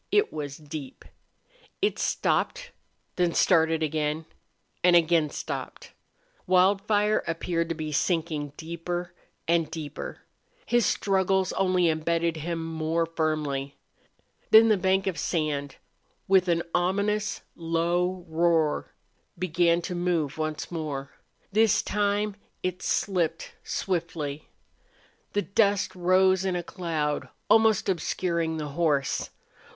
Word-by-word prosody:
It 415 +1 +3
was 145 -2 -5
deep. 150 -3 -8 0.7
It 410 +2 0
stopped - - 0 0.5
then 175 -2 +1
started 160 -2 +3
again 155 +1 -1 0.6
and 180 0 +6
again 165 -2 +4
stopped. - - -6 0.6
Wildfire 205 +3 +3
appeared 165 0 -1
to 165 - -1
be 155 -1 -4
sinking 155 -2 -1
deeper 170 +2 -5 0.3
and 165 -1 +2
deeper. 155 -3 -6 0.4
His 240 -1 +2
struggles 190 -1 +1
only 185 -2 +2
embedded 165 +1 0
him 165 +1 -3
more 165 +1 -1
firmly. 155 -4 -2 0.7
Then 225 +1 +8
the 215 - +5
bank 190 +1 +1
of 190 -3 -2
sand, 145 -4 -1 0.5
with 190 -1 +4
an 170 -1 +2
ominous, 200 +4 0
low 175 +2 0
roar, 160 -1 +1 0.4
began 170 -1 +2
to 180 - -4
move 175 -5 0
once 155 +1 -3
more. 150 -5 -4 0.4
This 215 0 +3
time 205 0 0 0.3
it 185 0 -2
slipped 170 -4 -1
swiftly. 160 -5 -3 0.8
The 205 - +1
dust 200 -1 +2
rose 185 +1 +3
in 190 -2 0
a 175 - -2
cloud, 160 -5 -2 0.2
almost 220 -2 +5
obscuring 170 -2 -1
the 150 -1 -4
horse. 145 -3 0
170 Hz, 115 wpm, -27 LUFS, 160-190 Hz, 0.8 s, Then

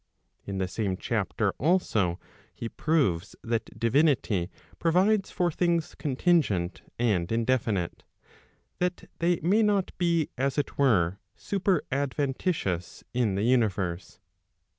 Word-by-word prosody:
In 100 -1 -3
the 95 -1 0
same 95 0 -2
chapter - - -1
also 110 - +1 0.4
he 115 - -4
proves 115 - 0
that 115 0 -3
divinity 115 - +2 0.3
provides 190 +5 +3
for 175 -2 0
things 170 0 0
contingent 130 - +1 0.2
and 100 -7 +1
indefinite, 115 -6 0 0.8
that 180 0 -2
they 170 0 +2
may 195 +8 +3
not 205 -3 +1
be 170 -3 +1
as 135 +2 0
it 145 - -1
were 100 -9 +3 0.2
super 195 -4 0
adventitious 135 - -1
in 120 -6 +1
the 100 - 0
universe. 100 -8 0
130 Hz, 115 wpm, -27 LUFS, -, 0.8 s, provides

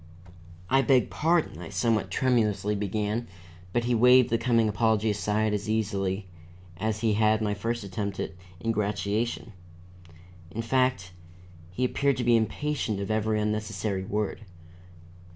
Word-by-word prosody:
"I 135 +5 +4
beg 135 -2 +3
pardon," 160 - +1
I 80 - -7
somewhat 105 +3 0
tremulously 110 -5 +1
began, 105 +3 -2 0.4
but 120 +3 0
he 120 +1 0
waved 125 +1 +6
the 115 - +2
coming 115 -2 +2
apology 110 0 +2
aside 105 +1 0
as 105 +1 -3
easily, 100 -3 -1 0.5
as 110 +2 -2
he 110 -2 +2
had 110 +1 +3
my 105 -2 0
first 115 +2 -3
attempt 100 0 -4
at - - -3 0.3
ingratiation. 105 +1 -1 1.0
In 115 +6 -4
fact, 125 -7 +1 0.6
he 110 +8 -1
appeared 140 +2 +1
to 125 - -1
be 120 0 +4
impatient 115 -1 -1
of 100 +1 -3
every 110 0 +1
unnecessary 105 -2 -2
word. 105 +3 -2
110 Hz, 135 wpm, -27 LUFS, 105-115 Hz, 1.0 s, waved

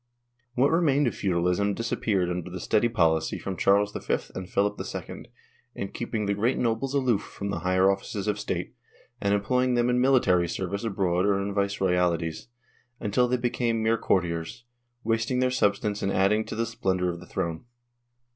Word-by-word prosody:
What 135 +3 +3
remained 150 -4 +3
of 120 - 0
feudalism 90 +2 0
disappeared 100 -5 0
under 90 0 -4
the 90 +1 -6
steady 120 +6 +2
policy 80 -6 +1
of 95 -2 -3
Charles 100 +1 +3
V - - -1 0.2
and 95 0 -6
Philip 100 +1 0
II, - - -7 0.5
in 100 - -4
keeping 115 -3 -3
the 100 - +1
great 115 +6 +1
nobles 125 +4 -1
aloof 125 -7 +2
from 100 -1 -6
the 90 - -2
higher 95 +2 +2
offices 100 0 -4
of 105 0 0
state, - - -3 0.5
and 100 - +1
employing 125 +5 +1
them 120 0 +2
in 125 0 +2
military 100 -10 +3
service 100 +5 -3
abroad 95 -4 0
or 100 -1 +2
in 100 +1 -3
vice 100 0 -1
royalties, 90 -3 0 0.5
until 120 +4 +1
they 125 +1 +1
became 120 -2 0
mere 110 +1 +3
courtiers, 90 +6 -1 0.4
wasting 115 +3 0
their 130 0 +2
substance 105 -3 0
in 100 - 0
adding 100 +3 +2
to - - -6
the 115 +1 0
splendor 95 -5 -1
of 85 - -8
the 90 - -13
throne. 85 +2 -3
100 Hz, 175 wpm, -26 LUFS, 95-120 Hz, 0.5 s, What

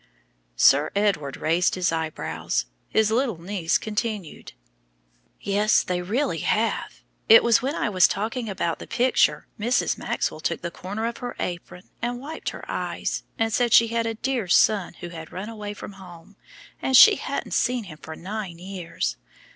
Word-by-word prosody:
Sir 140 - +5
Edward 195 -10 0
raised 170 +3 +1
his 180 -2 +1
eyebrows. 160 - -2 0.2
His 220 -1 +2
little 230 -6 0
niece 175 -1 0
continued: 210 -4 -4 0.9
"Yes, 205 +2 +2
they 180 -1 -2
really 225 +11 -1
have. - - -1 0.3
It 225 - +9
was 235 -2 +4
when 275 +5 -2
I - - 0
was 185 -3 +5
talking 225 +3 -3
about 170 -4 -2
the - - -9
picture 255 +1 +2
Mrs. 235 +4 +1
Maxwell - - -2
took - - -2
the 170 - -3
corner 205 +6 -5
of 235 0 -3
her 245 0 -6
apron 180 0 -5 0.2
and 240 +1 -2
wiped 305 +5 -5
her - - -9
eyes, - - -3 0.2
and 225 -1 0
said 240 0 +2
she 230 0 +7
had 230 0 0
a 225 - -2
dear 245 -3 -2
son 185 0 +3
who 175 - -6
had 160 -2 -9
run 195 +4 -6
away 210 -2 -6
from - - -8
home, 185 0 -14 0.5
and 265 -1 +4
she 420 - +9
hadn't - - -4
seen 245 -1 +1
him 155 -6 -11
for 160 - -8
nine 190 -1 -6
years. 185 -1 -4
205 Hz, 170 wpm, -24 LUFS, 175-230 Hz, 0.9 s, It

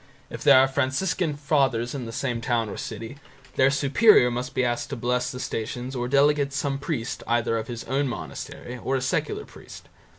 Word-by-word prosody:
If - - -7
there - - +8
are 135 - +5
Franciscan 145 +5 0
Fathers 135 -5 +1
in 130 -4 -5
the - - -6
same 115 0 -2
town 115 -2 0
or - - -6
city, 125 +5 -7 0.4
their 130 0 +5
superior 140 - +5
must 125 +1 -4
be 130 - +2
asked 120 +4 -2
to 140 - -3
bless 125 +1 -1
the 125 - -6
Stations 125 +3 -4
or 120 -1 -2
delegate 140 +1 +3
some 140 -1 -1
priest 135 -5 -3
either 115 -1 +1
of 110 0 -3
his 120 -1 -6
own 140 +2 0
monastery 120 +1 -7
or 135 - -1
a 130 - 0
secular 130 - -1
priest. - - -13
130 Hz, 195 wpm, -25 LUFS, 120-140 Hz, 0.4 s, there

